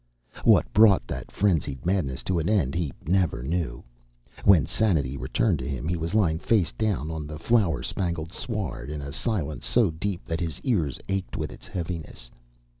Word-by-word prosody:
What - - +6
brought 105 - +6
that - - -6
frenzied 75 -9 0
madness 90 -8 0
to 90 -2 0
an 80 - -1
end 90 -11 +2
he 85 -5 -1
never 90 -7 +1
knew. 75 -4 -2 0.6
When 90 -8 +6
sanity 75 -11 +1
returned 85 - 0
to 65 - -4
him 65 +1 -3
he 90 - 0
was 85 +4 -3
lying 85 -7 +3
face 95 -5 +2
down 100 -8 -1
on 80 -2 -4
the 75 0 -6
flower 105 0 +2
spangled 85 -2 -2
sward 105 - -4
in 75 -1 -5
a 70 - -6
silence 80 - -2
so 115 -8 +4
deep 95 +3 -4
that 80 -1 -2
his 85 -2 -3
ears 90 - 0
ached 95 -1 -2
with - - -3
its - - -11
heaviness. 80 -8 -6
85 Hz, 180 wpm, -26 LUFS, 75-100 Hz, 0.6 s, What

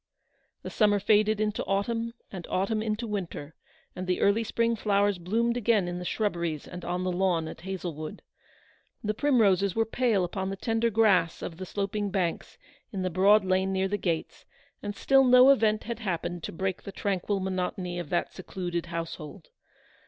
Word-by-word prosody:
The - - -6
summer 205 -2 +3
faded 210 +1 +3
into 215 0 -1
autumn, 230 +4 -1 0.2
and 180 -4 -7
autumn 205 +4 0
into 220 +1 -2
winter, 180 -8 -5 0.4
and 185 0 -5
the 180 - 0
early 205 +3 +3
spring 230 +1 0
flowers 205 -2 +1
bloomed 230 +7 0
again 220 -5 +2
in 175 0 -4
the 180 - -6
shrubberies 170 -7 -2
and 180 -1 -8
on 180 +1 -2
the 185 - 0
lawn 175 -3 +1
at - - -9
Hazlewood. 175 -4 -6 0.8
The 215 0 0
primroses 205 -8 +3
were 225 0 +2
pale 225 -4 +1
upon 190 +2 -3
the 195 - -3
tender 225 +3 0
grass 200 -6 +3
of 165 - -6
the 185 0 -6
sloping 205 +1 -2
banks 185 -4 -2 0.3
in 190 -3 -3
the 185 - -1
broad 195 +3 +5
lane 190 +1 +1
near 190 0 +1
the 205 +2 -1
gates, 165 -5 -3 0.4
and 205 0 -5
still 270 +5 +4
no 255 +1 +7
event 215 -5 +2
had 235 0 -5
hap 185 -7 -2
pened 175 0 -4
to - - -5
break 190 +2 -3
the 200 - -8
tranquil 200 0 -1
monotony 185 -1 -3
of 170 -4 -6
that 175 - -1
secluded 175 -2 -4
household. 165 0 -6
195 Hz, 180 wpm, -28 LUFS, 180-215 Hz, 0.8 s, no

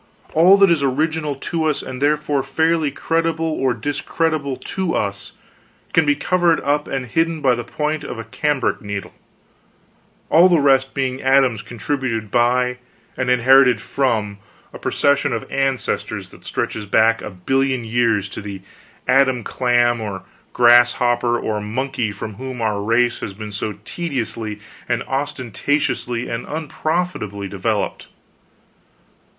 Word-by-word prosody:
All 180 +5 +6
that 195 -2 +5
is 165 -4 +2
original 150 +2 0
in 165 - -3
us, 150 - -2
and 130 0 -7
therefore 150 -1 +1
fairly 160 +3 +1
creditable 165 +3 -1
or 135 -6 0
discreditable 145 +3 -1
to 185 -3 -3
us, 100 -1 -3 0.6
can 160 - +3
be 145 - +4
covered 175 -1 +2
up 145 +1 0
and 135 -2 -3
hidden 165 +6 0
by 135 -4 +3
the 120 0 -3
point 150 +4 -2
of 120 - -6
a 115 - -5
cambric 145 -2 -1
needle, 100 -1 -5 1.2
all 175 +3 +7
the 170 -3 +4
rest 135 -2 +3
being 130 -1 -1
atoms 130 -4 +3
contributed 115 -3 -3
by, 125 +1 +2 0.4
and 130 -1 -2
inherited 125 -1 +5
from, 110 -5 -1 0.3
a - - -9
procession 140 -2 +1
of 115 - -3
ancestors 135 -2 -1
that - - -17
stretches 105 -1 -3
back 110 +3 +3
a - - -6
billion 130 +7 0
years 115 -3 +1
to - - -7
the 100 -2 -8 0.4
Adam 130 -3 +3
clam 120 -1 +1
or 100 -3 -5 0.3
grasshopper 120 0 +4
or 105 -1 -2
monkey 115 +1 -2
from 105 +1 -7
whom 130 0 -6
our 105 -3 -1
race 120 +3 +2
has 95 - -6
been 105 0 -7
so 105 +1 -3
tediously 115 -10 -4 0.3
and - - 0
ostentatiously 130 -2 -2
and 115 +1 -4
unprofitably 155 - -3
developed. 100 +1 -2
130 Hz, 140 wpm, -20 LUFS, 115-145 Hz, 1.2 s, all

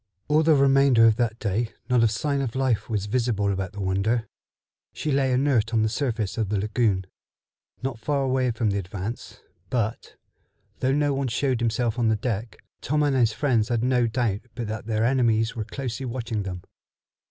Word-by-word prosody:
All 150 +1 +4
the 160 -1 +4
remainder 135 -4 +5
of 110 -1 +4
that 115 -2 0
day 110 +1 -2
not 125 -2 +3
a 115 - +5
sign 140 +6 -1
of 125 -3 -3
life 130 -5 0
was 105 -3 -1
visible 105 -3 0
about 95 +1 -4
the 100 - -6
Wonder. 100 +5 0 0.7
She 155 - -3
lay 135 -1 +2
inert 125 -4 +2
on 110 - +3
the 110 - +1
surface 110 -5 -2
of 110 -3 0
the 105 - 0
lagoon, 105 -2 0 0.8
not 130 -4 -3
far 140 +3 0
away 130 -1 +1
from 110 -2 0
the 100 - 0
Advance; 95 +4 -6 0.3
but, 115 -3 -2 0.6
though 130 +1 +1
no 145 0 +2
one 135 0 -1
showed 125 +1 0
himself 115 0 0
on 115 - +2
the 110 - +3
deck, 110 0 -3 0.2
Tom 150 +2 +1
and 145 -2 +2
his 120 -4 +3
friends 115 -2 +1
had 120 -1 0
no 125 -1 +2
doubt 110 -3 -1
but 120 -1 -3
that 110 +1 -5
their 110 0 +1
enemies 115 -3 +2
were 110 -2 -3
closely 130 +2 -5
watching 115 -3 -3
them. 90 -3 -6
115 Hz, 190 wpm, -25 LUFS, 110-130 Hz, 0.8 s, remainder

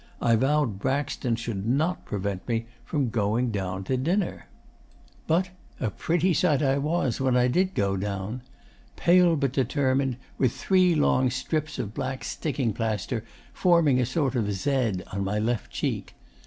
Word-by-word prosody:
I 115 -1 +3
vowed 135 -4 +1
Braxton 130 -1 -1
should 115 -4 -4
not 155 +9 0
prevent 100 -2 -3
me 115 -1 -1 0.2
from 140 -6 -1
going 115 +3 +1
down 95 -2 -3
to 130 +7 -1
dinner. 175 +9 -1 0.8
'But 180 +3 +1 0.3
a 110 -5 -1
pretty 175 - +1
sight 155 -2 +2
I 135 0 +2
was 145 -5 0
when 130 -2 +3
I 125 0 +4
did 185 +8 +1
go 100 -1 +1
down. 100 +4 -3 0.5
Pale 175 -1 +5
but 140 -4 0
determined, 130 -1 +1 0.2
with 130 -3 +2
three 185 -3 +3
long 130 -3 +3
strips 150 +4 -2
of 105 -1 -4
black 130 0 -4
sticking 135 -7 -2
plaster 115 +1 -2 0.3
forming 170 -7 +4
a 125 - +2
sort 135 -1 0
of 110 -5 0
Z 115 -3 0
on 100 0 -1
my 100 +2 -1
left 115 +2 -1
cheek. - - -3
130 Hz, 155 wpm, -26 LUFS, 110-150 Hz, 0.8 s, Pale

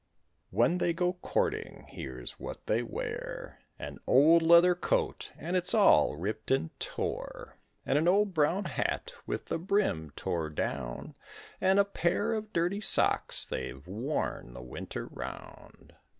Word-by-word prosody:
When 180 +1 +2
they 170 - +1
go 180 +1 0
courting, 180 - -2
here's 65 -2 -7
what - - -7
they 110 +2 +1
wear: 120 - -5 0.2
An - - -7
old 160 +6 +6
leather 170 +2 +7
coat, 175 - -1
and 175 +4 -3
it's 180 +3 +3
all 135 - +5
ripped 105 +7 -4
and 105 -12 +1
tore; - - -5 0.3
And 145 - +2
an 160 - +1
old 200 +2 +3
brown 170 +5 +2
hat - - -2
with - - -3
the - - -2
brim 175 - 0
tore 80 -2 -2
down, 65 -5 -4 0.5
And 190 +1 +4
a 200 - +5
pair 200 +3 0
of 215 -1 -4
dirty 180 +4 0
socks, - - +2
they've 65 +3 -5
worn 110 - -3
the 60 - -8
winter 60 - -6
round. - - -10
165 Hz, 145 wpm, -30 LUFS, -, 0.5 s, leather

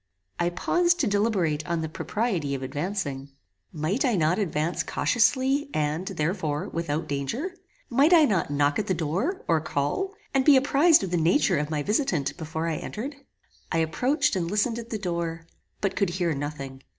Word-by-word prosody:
I 175 0 +2
paused 345 - +1
to - - +2
deliberate 200 -7 +1
on 170 -1 -1
the 160 - -2
propriety 170 - -2
of 135 - -5
advancing. 145 -1 -3 0.4
Might 160 - -1
I 250 -5 +2
not 170 +2 +2
advance 170 -3 -1
cautiously, 265 +4 +1
and, 155 +4 -1
therefore, 155 -3 -2
without 160 -2 -2
danger? 220 - -3 0.3
Might 275 +7 +3
I 330 -3 +7
not 195 - 0
knock 145 +2 +1
at 210 - -2
the 185 - +1
door, 180 - -2
or 165 -2 +2
call, 160 - -2 0.2
and 270 -1 +3
be 280 -1 +7
apprized 285 - +4
of 190 - -3
the 175 - +1
nature 170 - +3
of 150 0 -2
my 150 -2 -1
visitant 195 - 0
before 160 0 -4
I 160 -2 -1
entered? 265 +7 -5 0.6
I - - +1
approached 250 - +1
and 170 -3 -1
listened 220 +4 0
at 230 0 -9
the 220 - -2
door, 170 -4 -3 0.4
but 195 -2 0
could 200 - +1
hear 175 -2 0
nothing. 140 -2 -5
175 Hz, 175 wpm, -26 LUFS, 155-235 Hz, 0.6 s, I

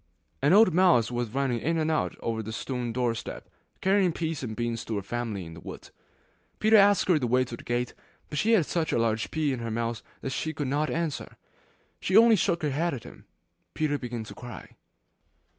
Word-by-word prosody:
An 145 +3 +4
old 200 -2 +6
mouse 165 -11 +4
was 120 -1 -2
running 130 0 0
in 165 +8 0
and 160 0 +1
out 155 - 0
over 115 -1 -2
the 110 0 -6
stone 120 +1 -3
doorstep, 120 -1 -3 0.3
carrying 190 -1 +3
peas 160 -2 -3
and 110 -4 -5
beans 120 -1 -2
to 110 - -3
her 100 - -2
family 110 -3 -4
in 80 - -9
the 80 - -10
wood. - - -10 0.7
Peter 220 +1 +4
asked 200 -2 +5
her 175 -5 +4
the 125 - -1
way 125 +2 +3
to 120 - -7
the - - -13
gate, 120 +1 -2 0.3
but 150 - -3
she 225 +2 +3
had 185 -8 +4
such 160 0 -1
a - - +1
large 115 -1 0
pea 155 -3 0
in 125 - -4
her 115 -1 -4
mouth 115 0 -2 0.2
that 135 - -4
she 160 +3 -3
could 145 -4 -2
not 150 +3 0
answer. 165 -3 -3 0.6
She 190 - +2
only 230 0 +8
shook 175 -3 0
her 150 - +1
head 160 +2 0
at 120 - -8
him. - - -13 0.5
Peter 145 -2 0
began 120 -2 -5
to - - -10
cry. 120 -2 -10
135 Hz, 215 wpm, -27 LUFS, 115-165 Hz, 0.7 s, only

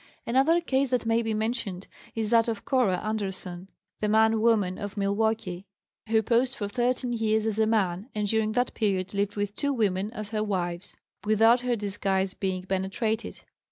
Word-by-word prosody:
Another 270 +8 +3
case 275 -4 +1
that 245 -2 0
may 225 +1 +2
be 225 -1 -1
mentioned 215 -4 -2 0.3
is 220 -1 -2
that 230 -1 +4
of 220 -3 -3
Cora 245 -9 +2
Anderson, 190 -4 -3 0.3
"the 210 - 0
man 220 +1 +4
woman 210 -5 +2
of 205 +1 -6
Milwaukee," 200 -2 -1 0.4
who 220 0 +3
posed 245 +4 +2
for 205 - -3
thirteen 245 +2 0
years 220 -1 +1
as 220 -1 -1
a 220 - +3
man, 200 -1 0
and 210 -1 -1
during 215 0 +1
that 245 +1 0
period 195 -4 -1
lived 200 0 -1
with 205 0 -2
two 285 - 0
women 205 -5 0
as 215 -3 -6
her 215 -1 0
wives 180 -3 -3 0.3
without 225 +3 +5
her 245 0 0
disguise 195 -2 -1
being 185 -2 -3
penetrated. 195 +4 -2
215 Hz, 175 wpm, -27 LUFS, 195-230 Hz, 0.4 s, without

